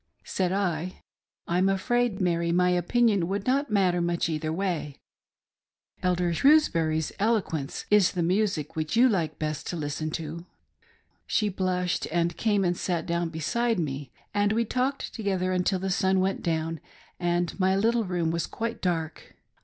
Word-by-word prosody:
Said 185 Hz, -2 st, -1 dB
I 185 Hz, -3 st, -2 dB
— -, -, -68 dB
' -, -, -54 dB
I'm 180 Hz, +3 st, +2 dB
afraid, 240 Hz, +2 st, +1 dB
Mary, 170 Hz, -2 st, +1 dB
my 180 Hz, +1 st, +3 dB
opinion 195 Hz, +1 st, +2 dB
would 200 Hz, +2 st, -2 dB
not 275 Hz, +3 st, +1 dB
matter 185 Hz, -4 st, +2 dB
much 170 Hz, 0 st, 0 dB
either 155 Hz, 0 st, -2 dB
way; 165 Hz, -5 st, -2 dB, 1.1 s
Elder 180 Hz, -1 st, +1 dB
Shrewsbury's 165 Hz, -, +3 dB
eloquence 195 Hz, -10 st, -1 dB
is 210 Hz, -3 st, +5 dB
the 175 Hz, -, 0 dB
music 185 Hz, -4 st, 0 dB
which 155 Hz, +4 st, -2 dB
you 245 Hz, +3 st, +6 dB
like 180 Hz, -9 st, 0 dB
best 155 Hz, -1 st, -3 dB
to -, -, -3 dB
listen 155 Hz, 0 st, -3 dB
to." 165 Hz, +2 st, -7 dB, 0.8 s
She 210 Hz, -1 st, +1 dB
blushed, 180 Hz, -2 st, -1 dB
and 170 Hz, 0 st, +1 dB
came 205 Hz, -4 st, +1 dB
and 175 Hz, 0 st, +1 dB
sat 175 Hz, -1 st, -2 dB
down 170 Hz, 0 st, -1 dB
beside 225 Hz, +9 st, 0 dB
me, 140 Hz, -4 st, -3 dB, 0.2 s
and 205 Hz, 0 st, +2 dB
we 230 Hz, +1 st, +1 dB
talked 255 Hz, +4 st, -2 dB
together 190 Hz, -4 st, -1 dB
until 185 Hz, +1 st, +1 dB
the 190 Hz, +1 st, -2 dB
sun 190 Hz, +1 st, +2 dB
went 190 Hz, +1 st, 0 dB
down 165 Hz, -1 st, -1 dB, 0.4 s
and 175 Hz, +1 st, -1 dB
my 190 Hz, 0 st, +3 dB
little 230 Hz, +3 st, +2 dB
room 175 Hz, -3 st, -1 dB
was 170 Hz, 0 st, -1 dB
quite 230 Hz, +1 st, -4 dB
dark. 165 Hz, -4 st, -3 dB
180 Hz, 160 wpm, -27 LUFS, 165-200 Hz, 1.1 s, you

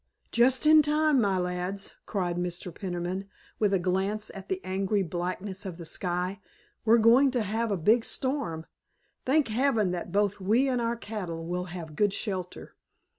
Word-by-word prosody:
"Just 255 Hz, +4 st, +4 dB
in 310 Hz, 0 st, +8 dB
time, 300 Hz, -2 st, +3 dB
my 195 Hz, -3 st, +2 dB
lads," 180 Hz, +2 st, -2 dB
cried 180 Hz, -4 st, -1 dB
Mr. 175 Hz, 0 st, -4 dB
Peniman 185 Hz, +2 st, -4 dB, 0.3 s
with 210 Hz, -2 st, +2 dB
a 195 Hz, -, +3 dB
glance 190 Hz, +4 st, -1 dB
at 195 Hz, -1 st, -10 dB
the 190 Hz, -, -1 dB
angry 195 Hz, +2 st, 0 dB
blackness 185 Hz, +3 st, -4 dB
of 185 Hz, -4 st, -6 dB
the 170 Hz, -, -8 dB
sky. 180 Hz, +4 st, -2 dB, 0.4 s
"We're 225 Hz, +1 st, +5 dB
going 235 Hz, +5 st, +6 dB
to 250 Hz, -3 st, 0 dB
have 225 Hz, +3 st, -1 dB
a 200 Hz, -, 0 dB
big 220 Hz, +8 st, +3 dB
storm. 245 Hz, -, -2 dB, 0.6 s
Thank 275 Hz, -2 st, +3 dB
heaven 225 Hz, -4 st, +2 dB
that 175 Hz, -1 st, -4 dB
both 205 Hz, +1 st, +1 dB
we 220 Hz, +8 st, +2 dB
and 250 Hz, -2 st, 0 dB
our 230 Hz, 0 st, 0 dB
cattle 185 Hz, -8 st, -5 dB
will 180 Hz, +1 st, -2 dB
have 175 Hz, -4 st, -8 dB
good 205 Hz, +3 st, +2 dB
shelter. 185 Hz, -5 st, -4 dB
195 Hz, 170 wpm, -28 LUFS, 180-230 Hz, 0.6 s, in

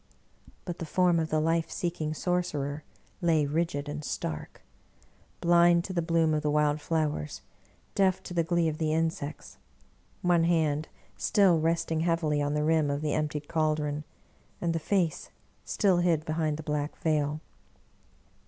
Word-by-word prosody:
But 175 Hz, -2 st, -5 dB
the 165 Hz, -, -4 dB
form 180 Hz, 0 st, +3 dB
of 160 Hz, -1 st, -1 dB
the 155 Hz, -, +1 dB
life 165 Hz, +1 st, +1 dB
seeking 165 Hz, -4 st, -3 dB
sorcerer 155 Hz, -5 st, -2 dB, 0.4 s
lay 160 Hz, -4 st, +3 dB
rigid 150 Hz, -1 st, -1 dB
and 150 Hz, +1 st, -5 dB
stark; 80 Hz, -, -5 dB, 0.8 s
blind 170 Hz, 0 st, +5 dB
to 190 Hz, -, -5 dB
the 170 Hz, -, +1 dB
bloom 165 Hz, -1 st, +2 dB
of 155 Hz, -, +1 dB
the 150 Hz, -, 0 dB
wild 150 Hz, 0 st, +2 dB
flowers, 150 Hz, -, -2 dB, 0.5 s
deaf 190 Hz, -1 st, +2 dB
to 180 Hz, -, -7 dB
the 170 Hz, -, +2 dB
glee 170 Hz, 0 st, +1 dB
of 155 Hz, -1 st, -3 dB
the 155 Hz, -1 st, 0 dB
insects 160 Hz, -3 st, -3 dB, 0.3 s
— -, -, -35 dB, 0.3 s
one 175 Hz, -2 st, +3 dB
hand 160 Hz, -3 st, +1 dB, 0.3 s
still 190 Hz, -5 st, +4 dB
resting 165 Hz, 0 st, 0 dB
heavily 160 Hz, -3 st, +1 dB
on 145 Hz, +1 st, 0 dB
the 150 Hz, -, +1 dB
rim 155 Hz, -1 st, +2 dB
of 140 Hz, +1 st, -1 dB
the 150 Hz, -1 st, -1 dB
emptied 150 Hz, -1 st, -2 dB
caldron, 150 Hz, -2 st, 0 dB, 0.6 s
and 170 Hz, -1 st, 0 dB
the 165 Hz, -, -1 dB
face 175 Hz, -1 st, 0 dB, 0.4 s
still 195 Hz, -4 st, +2 dB
hid 170 Hz, -3 st, +2 dB
behind 155 Hz, -1 st, -1 dB
the 160 Hz, -, -7 dB
Black 150 Hz, 0 st, -2 dB
Veil. 150 Hz, -1 st, 0 dB
160 Hz, 160 wpm, -28 LUFS, 150-170 Hz, 0.8 s, blind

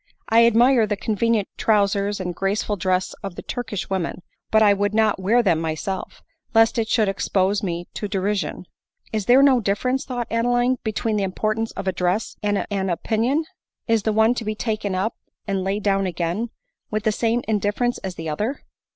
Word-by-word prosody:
I 230 Hz, +1 st, +6 dB
admire 235 Hz, 0 st, +4 dB
the 205 Hz, -1 st, -1 dB
convenient 220 Hz, 0 st, 0 dB
trowsers 205 Hz, -1 st, +1 dB
and 180 Hz, -1 st, -3 dB
graceful 195 Hz, +3 st, -1 dB
dress 185 Hz, 0 st, 0 dB
of 195 Hz, -4 st, -6 dB
the -, -, -8 dB
Turkish 225 Hz, -6 st, -4 dB
women; 185 Hz, -2 st, -3 dB, 0.3 s
but 220 Hz, 0 st, +4 dB
I 205 Hz, -1 st, +6 dB
would 205 Hz, +1 st, -1 dB
not 220 Hz, -3 st, +3 dB
wear 230 Hz, +6 st, +3 dB
them 170 Hz, -6 st, +2 dB
myself, 165 Hz, +4 st, -4 dB, 0.3 s
lest 225 Hz, +1 st, +5 dB
it 220 Hz, -1 st, -1 dB
should 220 Hz, -3 st, +3 dB
expose 195 Hz, +1 st, +1 dB
me 175 Hz, -3 st, -3 dB
to 210 Hz, -, -4 dB
derision." 200 Hz, -1 st, -2 dB, 0.2 s
" -, -, -35 dB
Is 215 Hz, -3 st, -2 dB
there 260 Hz, +3 st, +7 dB
no 270 Hz, -3 st, +5 dB
difference," 250 Hz, +6 st, 0 dB
thought 245 Hz, -4 st, -3 dB
Adeline, 245 Hz, +2 st, +2 dB
" -, -, -57 dB
between 220 Hz, 0 st, -1 dB
the 200 Hz, -, 0 dB
importance 215 Hz, +4 st, -1 dB
of 195 Hz, -, -6 dB
a -, -, +3 dB
dress 180 Hz, +5 st, -1 dB
and 205 Hz, -1 st, 0 dB
an 195 Hz, -1 st, -1 dB
opinion! 235 Hz, -, 0 dB, 0.4 s
Is 225 Hz, -2 st, +3 dB
the 220 Hz, -, 0 dB
one 220 Hz, +2 st, +4 dB
to 240 Hz, -, -4 dB
be 215 Hz, 0 st, -2 dB
taken 215 Hz, -3 st, -2 dB
up, 195 Hz, +5 st, 0 dB, 0.3 s
and 195 Hz, -2 st, -1 dB
laid 195 Hz, +2 st, -2 dB
down 195 Hz, -1 st, +2 dB
again, 175 Hz, +6 st, -2 dB, 0.4 s
with 215 Hz, -1 st, -2 dB
the 220 Hz, -, +2 dB
same 230 Hz, +2 st, 0 dB
in 215 Hz, -2 st, +1 dB
difference 225 Hz, +5 st, 0 dB
as 190 Hz, -2 st, -6 dB
die 165 Hz, -, -7 dB
other 210 Hz, -, -3 dB
210 Hz, 195 wpm, -22 LUFS, 195-225 Hz, 0.4 s, there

